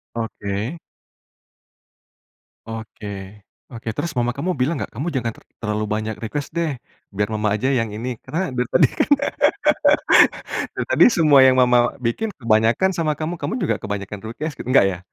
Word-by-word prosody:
Oke. 115 +4 -4 1.9
Oke, 110 -1 -8 0.7
oke. 115 0 -10
Terus 170 - -2
mama 120 0 +1
kamu 180 +6 -1
bilang 130 +6 +1
nggak - - -4
kamu 140 +10 -4
jangan 120 -2 -1
ter - - -18 0.2
terlalu 105 -1 -1
banyak 110 0 -2
request 140 +6 -4
deh, 165 -2 0 0.4
biar 105 +1 0
mama 105 0 0
aja 120 +5 -1
yang 115 - -1
ini. 115 +4 -4 0.2
Karena 180 +4 -2
dari 125 - +1
tadi - - +6
kan, - - +2 1.7
dari - - -3
tadi - - +6
semua 150 -4 +5
yang 130 - +5
mama 125 -1 +3
bikin 205 - -2
kebanyakan 115 - +2
sama 165 -4 -1
kamu, 155 +3 -4
kamu 220 - -3
juga - - +1
kebanyakan 100 -1 -5
protes. 150 +7 -5
Nggak 130 -3 +3
ya? 90 - -5
120 Hz, 155 wpm, -21 LUFS, 110-150 Hz, 1.9 s, tadi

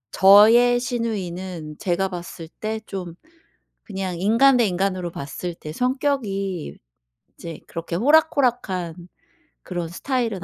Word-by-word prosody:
저의 225 +5 +7
시누이는 185 -9 -4
제가 190 0 0
봤을 175 -2 -8
때 220 +3 -5
좀 185 -5 -7 0.7
그냥 190 -4 -5
인간 230 +7 +4
대 240 - +3
인간으로 185 -1 -1
봤을 165 +4 -6
때 155 -2 -9
성격이 205 - -2 0.6
이제 165 -2 -8
그렇게 170 0 -5
호락호락한 245 - +2 0.7
그런 175 -2 -4
스타일은 225 0 -2
195 Hz, 245 characters per minute, -22 LUFS, 175-235 Hz, 0.7 s, 저의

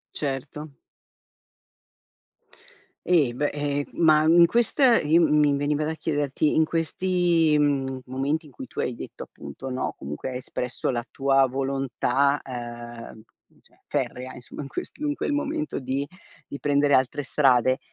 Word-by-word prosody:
Certo. 145 +2 -4 2.4
Eh 160 -8 +3
beh, 145 +4 0
ehm, 145 -1 -1
ma 155 -2 +4
in 170 +2 +7
questa 240 - +3
in 150 0 +3
mi 145 -1 +4
veniva 145 +1 0
da 160 - -2
chiederti: 145 -2 0
in 160 - +4
questi, 165 -1 +1
mhmm, 135 -3 0
momenti 140 +5 -2
in 145 - -16
cui 130 - -8
tu - - -6
hai 125 - -1
detto, - - -9
appunto 70 - -9
no, 130 0 -2
comunque 75 - -6
hai 125 - -5
espresso 125 0 -3
la 120 -2 -2
tua 135 -1 +3
volontà, 135 +1 0
ehm, 120 -2 -8 0.4
cioè - - -25
ferrea, 130 +1 -3
insomma, 125 +4 -9
in 140 - -7
questo 285 - -7
in 290 - 0
quel 295 - -2
momento 305 +1 -2
di 135 +2 -2 0.4
di 140 - -7
prendere 145 0 +2
altre 130 +2 +2
strade, 130 -2 +3
140 Hz, 145 wpm, -25 LUFS, 130-155 Hz, 2.4 s, in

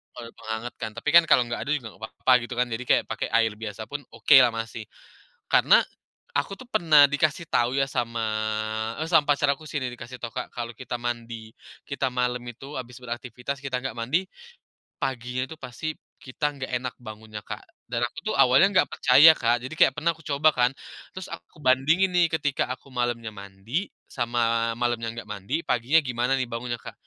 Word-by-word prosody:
Kalau 120 -2 -8
mau - - -14
hangat 110 +2 -4
kan 110 - -5
tapi 115 +7 -3
kan 170 - +10
kalau 160 - +5
nggak 120 - -3
ada 150 - -3
juga 140 -7 -1
gak - - -16 0.2
papa 130 - +2
gitu 120 - -6
kan 125 - +2
jadi 115 +1 -4
kayak - - +4
pakai - - -2
air 115 -2 +2
biasa 110 0 -7
pun 145 0 -5
okelah 120 +2 +6
masih. 115 0 -5 0.7
Karena, - - +6 0.6
aku 145 +7 -1
tuh 245 +5 -11
pernah 155 - +6
dikasih 150 +3 0
tahu 120 +1 +2
ya 135 - 0
sama, 115 -2 -2 0.8
eee, 160 - -3
sama 160 -4 +5
pacar 145 0 +1
aku 140 +3 -1
sih 145 -1 -4
nih 130 - -2
dikasih 125 +2 -10
tahu 115 - -4
Kak - - -5
kalau 120 -1 -5
kita 130 -1 -7
mandi, 115 -2 -5 0.4
kita 140 -1 -1
malam 125 0 0
itu 130 +4 -8
habis 125 0 -8
beraktivitas 125 +2 -5
kita 135 -2 -3
nggak 130 -3 -5
mandi, 155 +12 -1 0.7
paginya 125 0 -2
itu 160 - -9
pasti 150 +3 -6 0.2
kita 145 +3 -2
nggak 135 -2 -6
enak 125 0 -5
bangunnya 110 -1 -9
Kak. - - -8 0.2
Dan 120 0 0
aku 120 - -9
tuh - - -1
awalnya 135 +8 +6
nggak - - +4
percaya 145 +5 +7
Kak 120 -5 +1
jadi 130 - -6
kayak 145 - +4
pernah 165 +3 +1
aku 160 - -18
coba 150 0 +3
kan 125 -1 +3 0.5
terus 185 - -6
aku 170 - -12
bandingin 155 +9 +3
nih 175 -1 +5
ketika 145 -4 0
aku 130 - -14
malamnya 120 -3 -2
mandi, 100 - -5 0.2
sama 120 -1 -2 0.4
malamnya 120 -2 -1
nggak 115 - -7
mandi 100 +5 -8
paginya 125 +6 +2
gimana 125 +2 0
nih 130 - 0
bangunnya 120 0 -4
Kak. - - -10
125 Hz, 195 wpm, -25 LUFS, 115-145 Hz, 0.8 s, kan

